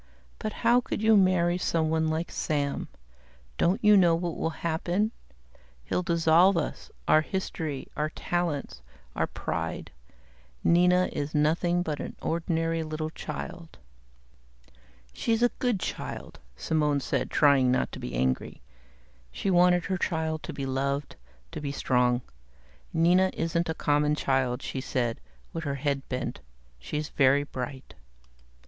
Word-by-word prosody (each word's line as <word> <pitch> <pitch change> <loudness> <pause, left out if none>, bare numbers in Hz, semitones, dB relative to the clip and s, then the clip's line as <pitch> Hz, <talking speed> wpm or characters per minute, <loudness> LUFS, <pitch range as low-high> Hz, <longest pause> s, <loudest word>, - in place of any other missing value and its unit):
"But 215 - -3
how 240 +2 +6
could - - -4
you 220 0 +6
marry 180 -2 +3
someone 160 -2 +1
like 160 +2 -2
Sam? 145 -3 -1 0.7
Don't 180 +5 +2
you 210 0 +7
know 175 -4 +5
what 170 -1 -2
will - - -1 0.2
happen? 175 +6 0 0.7
He'll - - -1
dissolve 170 +1 +4
us, - - -3 0.2
our 155 - +6
history, 160 -5 -4
our 150 0 -1
talents, 170 -3 -3 0.3
our - - 0
pride. - - -4 0.7
Nina 180 +1 +4
is 145 +2 -3
nothing 170 +4 +2
but 155 -4 -3
an - - -6
ordinary 165 0 -1
little 155 0 -4
child." 160 +2 -7 1.4
"She's 230 0 0
a 245 - +5
good 245 -6 +1
child," - - -6 0.2
Simone 150 -3 +1
said, 135 - -1
trying 140 -4 +4
not 130 - +1
to - - -8
be - - -5
angry. 65 +1 -1 0.7
She 190 - -1
wanted 180 -1 +4
her 185 -1 -1
child 160 -2 -1
to - - -6
be 140 -2 -4
loved, 140 +2 -2 0.4
to 160 -2 -6
be 140 -1 -3
strong. 125 -3 +1 0.7
"Nina 175 +3 +4
isn't 165 +1 -1
a 160 - -1
common 150 0 +2
child," 130 -3 0
she 135 - -4
said, 120 -3 -2 0.3
with 165 - -4
her 140 -2 -2
head 140 0 -1
bent. 125 -1 -3 0.4
"She's 150 0 -4
very 140 +1 +4
bright." 130 -1 -7
160 Hz, 140 wpm, -28 LUFS, 140-175 Hz, 1.4 s, you